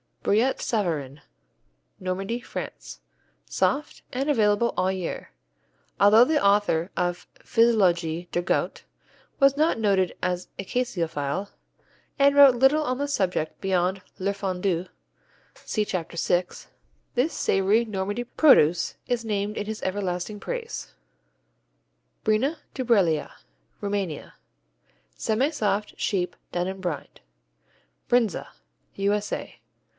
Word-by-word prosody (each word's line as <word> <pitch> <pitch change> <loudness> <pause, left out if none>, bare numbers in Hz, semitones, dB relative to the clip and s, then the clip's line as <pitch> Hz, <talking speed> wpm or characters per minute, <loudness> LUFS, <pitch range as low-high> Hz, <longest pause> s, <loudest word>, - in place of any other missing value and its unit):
Brillat 235 +6 +2
Savarin 155 - -2 0.8
Normandy, 195 +5 -3
France - - -8 0.4
Soft, 300 +2 -1
and 270 +4 -2
available 220 -3 +2
all 185 +1 +2
year. 185 -3 -5 0.7
Although 215 +4 +7
the 305 +2 +1
author 200 -3 +2
of 175 0 -2
Physiologie 180 -8 +2
du 175 - 0
Goût 175 - -1 0.6
was 275 0 +5
not 310 -5 +2
noted 195 -4 +2
as 180 0 -2
a 195 - -5
caseophile 175 - -2 0.7
and 280 0 +4
wrote 280 -3 +8
little 270 +5 +4
on 255 -3 -1
the 285 - -1
subject 185 - -1
beyond 185 0 0 0.2
Le 195 +2 -1
Fondue 185 -2 -2 0.7
(see 215 -2 -2
Chapter 170 -3 -4
6), 175 +2 -1 0.5
this 260 +6 +1
savory 200 +4 +2
Normandy 205 +2 -3
produce 235 - +4
is 240 -2 -1
named 210 -1 -2
in 205 - -2
his 220 0 -5
everlasting 190 +1 -2
praise. 480 - -5 1.3
Brina 245 +9 +1 0.2
Dubreala 200 - +2 0.5
Rumania 200 -6 -3 0.8
Semisoft, 220 -4 0
sheep, 180 -3 -1 0.2
done 175 0 -1
in 190 0 -5
brine. 175 -5 -3 1.0
Brindza 235 -6 +1 0.5
_U.S.A. 205 +1 -2
200 Hz, 110 wpm, -25 LUFS, 180-235 Hz, 1.3 s, wrote